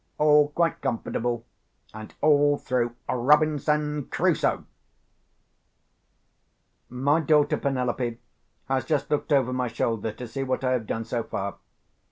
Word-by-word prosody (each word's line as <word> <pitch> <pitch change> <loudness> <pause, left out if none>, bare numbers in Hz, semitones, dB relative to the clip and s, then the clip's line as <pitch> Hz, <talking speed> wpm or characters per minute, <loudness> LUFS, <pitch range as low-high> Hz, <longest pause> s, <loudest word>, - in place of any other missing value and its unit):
All 150 -1 +5
quite 165 +2 0
comfortable, 120 0 -2 0.5
and 110 0 -9
all 145 -1 +4
through 120 -3 -1
Robinson 150 +2 +2
Crusoe! - - 0 2.2
My 140 +5 +1
daughter 150 -1 +3
Penelope 125 -3 -1 0.5
has 135 0 0
just 150 -4 -1
looked 150 +1 -1
over 130 -3 +3
my 125 -1 -1
shoulder 115 -1 -2
to 125 +3 -8
see 125 +4 -5
what 130 0 -2
I 130 - +1
have 120 -4 -1
done 115 0 -3
so 120 0 -2
far. 100 -3 -5
130 Hz, 125 wpm, -25 LUFS, 120-150 Hz, 2.2 s, All